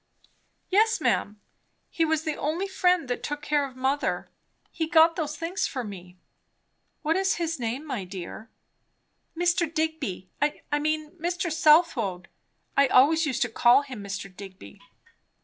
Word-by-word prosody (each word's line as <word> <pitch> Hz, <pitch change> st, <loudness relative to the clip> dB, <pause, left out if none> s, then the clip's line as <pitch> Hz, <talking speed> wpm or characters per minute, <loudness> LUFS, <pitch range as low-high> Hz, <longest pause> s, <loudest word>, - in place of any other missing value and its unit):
"Yes, 440 Hz, +4 st, +3 dB
ma'am. 210 Hz, +1 st, 0 dB, 0.5 s
He 330 Hz, -, +1 dB
was 320 Hz, -1 st, 0 dB
the 310 Hz, -2 st, -2 dB
only 330 Hz, +7 st, -2 dB
friend 360 Hz, -5 st, +2 dB
that 245 Hz, -, -3 dB
took 295 Hz, 0 st, -5 dB
care 290 Hz, -2 st, +1 dB
of 260 Hz, -, -15 dB
mother. 265 Hz, +2 st, -1 dB, 0.4 s
He 320 Hz, -2 st, -2 dB
got 325 Hz, 0 st, +5 dB
those 305 Hz, -3 st, -3 dB
things 335 Hz, +4 st, -2 dB
for 255 Hz, -3 st, -4 dB
me." 180 Hz, -4 st, -10 dB, 0.9 s
"What 320 Hz, +1 st, +1 dB
is 385 Hz, +1 st, +1 dB
his 330 Hz, -3 st, -2 dB
name, 245 Hz, +5 st, -3 dB
my 255 Hz, -9 st, -4 dB
dear?" 185 Hz, +4 st, -8 dB, 0.9 s
"Mr. 345 Hz, -2 st, +1 dB
Digby. 315 Hz, -, -2 dB
I 295 Hz, 0 st, -1 dB
mean, 310 Hz, 0 st, -1 dB
Mr. 345 Hz, +1 st, -2 dB
Southwode. 300 Hz, -, +3 dB, 0.5 s
I 280 Hz, 0 st, +5 dB
always 300 Hz, +6 st, +4 dB
used 265 Hz, -1 st, 0 dB
to 240 Hz, -, -3 dB
call 240 Hz, +4 st, +5 dB
him 255 Hz, -7 st, -8 dB
Mr. 195 Hz, -1 st, -6 dB
Digby." 185 Hz, -, -12 dB
300 Hz, 150 wpm, -26 LUFS, 240-330 Hz, 0.9 s, got